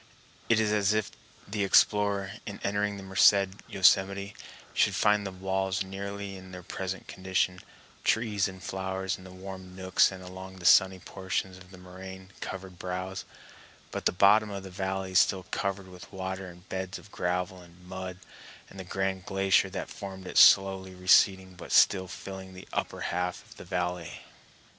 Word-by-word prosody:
It 115 -1 +5
is 110 -1 +2
as 105 0 +2
if 110 -2 -1 0.4
the 105 0 -1
explorer, 100 0 +3 0.2
in 100 - -6
entering 100 0 0
the 100 - -8
Merced 95 +1 +5 0.2
Yosemite, 100 +1 +3 0.4
should - - +3
find 105 -1 +3
the - - -5
walls 95 0 -1
nearly 100 +1 -6
in 95 0 -11
their 90 -1 -9
present 95 +2 -5
condition, 95 -1 -1 0.4
trees 105 -3 +2
and 95 -1 -10
flowers 95 +1 -3
in - - -13
the 95 - -11
warm 95 0 -9
nooks 95 0 +3
and 95 -1 -9
along 95 +1 -9
the 90 -2 -11
sunny 95 +1 +6
portions 95 +1 -4
of 90 0 -15
the 95 - -13
moraine 95 +1 -10
covered 95 -2 -7
brows, 90 +1 -4 0.7
but - - -1
the - - +2
bottom 105 +3 +5
of 100 -1 -6
the 95 - -9
valley 95 0 -3
still 95 0 +4
covered 100 -1 -2
with 90 0 -12
water 95 0 -5
and 90 +1 -15
beds 95 0 -4
of 105 - -15
gravel 90 +1 -2
and 90 +1 -17
mud, 95 0 -6 0.5
and 95 - -11
the - - -5
grand 95 0 -2
glacier 95 -1 +3
that - - -5
formed 95 -1 -8
it 90 - -7
slowly 95 -1 +6
receding 95 0 +4
but 90 - -10
still 95 -2 +5
filling 95 +1 -8
the 90 - -11
upper - - -3
half 90 +1 -2
of - - -16
the - - -10
valley. 90 -2 -3
95 Hz, 170 wpm, -29 LUFS, -, 0.7 s, sunny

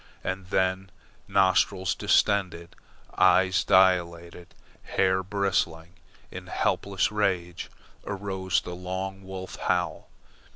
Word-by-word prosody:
And 95 0 -4
then, 95 0 0 0.4
nostrils 95 -1 +2
distended, 90 -4 0 0.4
eyes 95 +1 +4
dilated, 85 -2 +1 0.3
hair 95 0 +1
bristling 90 -4 -2 0.4
in - - -9
helpless 100 0 0
rage, 90 -4 -2 0.3
arose 95 -2 -2
the 90 - -7
long 95 +2 -5
wolf 95 0 -8
howl. - - -2
95 Hz, 90 wpm, -26 LUFS, 90-95 Hz, 0.4 s, eyes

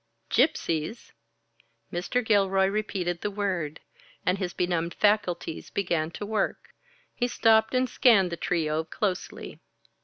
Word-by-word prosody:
"Gypsies?" 220 - 0 0.8
Mr. 205 +8 -1
Gilroy 195 -3 +3
repeated 190 -4 -2
the 210 - -1
word, 185 -7 -2 0.4
and 185 +2 +1
his 180 -3 -2
benumbed 170 -2 -1
faculties 195 -6 0
began 170 -5 -1
to 205 - -6
work. 215 -1 -2 0.4
He 245 - 0
stopped 220 -1 +3
and 255 0 +2
scanned 220 -9 +4
the - - -2
trio 160 -3 -1
closely. 185 +3 -4
190 Hz, 120 wpm, -27 LUFS, 170-215 Hz, 0.8 s, scanned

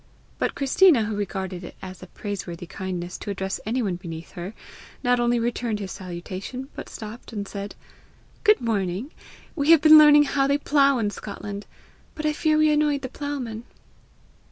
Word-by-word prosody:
But - - 0
Christina, 280 -1 +5
who 210 0 -3
regarded 190 -2 -4
it 175 - -9
as 185 -1 -9
a - - -10
praiseworthy 185 -4 -6
kindness 180 0 -5
to - - -7
address 190 -1 -3
any 245 +3 0
one 185 -4 -1
beneath 165 -2 -8
her, 185 +4 -7 0.5
not 245 0 +3
only 240 0 +2
returned 235 -1 -1
his 195 -2 -5
salutation, 185 +8 -6
but - - -7
stopped, 220 +2 -9
and 205 -3 -4
said, 200 0 -6 0.7
"Good 425 - +5
morning! 210 - -1 0.4
We 290 -2 0
have 330 -3 +8
been 310 0 +9
learning 295 -1 +8
how 275 -1 +1
they 280 +1 +3
plough 280 -2 +3
in 210 -3 0
Scotland, 205 0 -7 0.5
but 305 - -5
I 305 - +2
fear 310 0 +2
we 310 0 +4
annoyed 295 -2 +2
the 260 - -4
ploughman." 260 -6 -5
225 Hz, 175 wpm, -24 LUFS, 190-280 Hz, 0.7 s, been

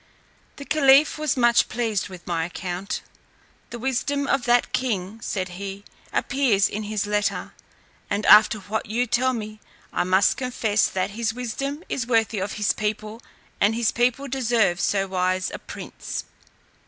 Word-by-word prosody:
The 280 - -9
caliph 285 0 +4
was 305 -3 0
much 240 -1 +4
pleased 220 -4 -1
with 185 -2 -11
my 170 -2 -1
account. 180 +3 -4 0.7
"The 240 - -6
wisdom 265 +3 -1
of 270 -2 0
that 240 0 +2
king," 220 -3 -2
said 185 -4 -3
he, 195 +2 -7 0.3
"appears 240 -8 +2
in 210 - -4
his 210 -1 -2
letter, 205 0 -1 0.6
and 205 +1 -1
after 210 +1 +7
what 215 +3 -3
you 235 +4 0
tell 255 +2 +1
me, 215 -2 -6 0.3
I - - +1
must 185 +2 +3
confess, 230 -5 +1
that 190 +1 -2
his 220 +1 -2
wisdom 275 +6 -4
is 245 -4 -3
worthy 225 -3 +1
of 195 - -3
his 210 -1 +1
people, 215 +1 -4 0.4
and 210 +2 +3
his 235 -2 +1
people 250 +3 +1
deserve 235 -8 +1
so 195 -1 +1
wise 185 0 -1
a - - -5
prince." - - -7
220 Hz, 155 wpm, -24 LUFS, 200-245 Hz, 0.7 s, after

